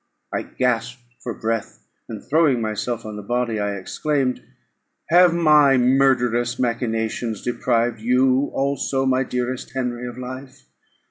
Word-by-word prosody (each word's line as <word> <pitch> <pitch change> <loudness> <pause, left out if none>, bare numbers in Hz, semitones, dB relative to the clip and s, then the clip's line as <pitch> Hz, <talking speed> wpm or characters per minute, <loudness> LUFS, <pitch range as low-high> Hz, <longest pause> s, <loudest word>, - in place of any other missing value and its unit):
I - - 0
gasped 125 0 -2 0.2
for 120 - -4
breath; 115 -1 -4 0.2
and, 110 -3 -7
throwing 150 -3 +2
myself 110 +1 -3
on 105 -1 -6
the - - -6
body, 120 +1 -1
I 105 0 -1
exclaimed, 130 +7 -1 0.7
"Have 175 +1 +6
my 150 -5 +5
murderous 125 -2 +2
machinations 115 -2 -2
deprived 120 -1 0
you 130 +3 +2
also, 135 -1 -1
my 130 0 +2
dearest 125 -1 -3
Henry, 125 -1 -3
of 120 0 -8
life? 130 +1 -9
125 Hz, 130 wpm, -22 LUFS, 115-135 Hz, 0.7 s, Have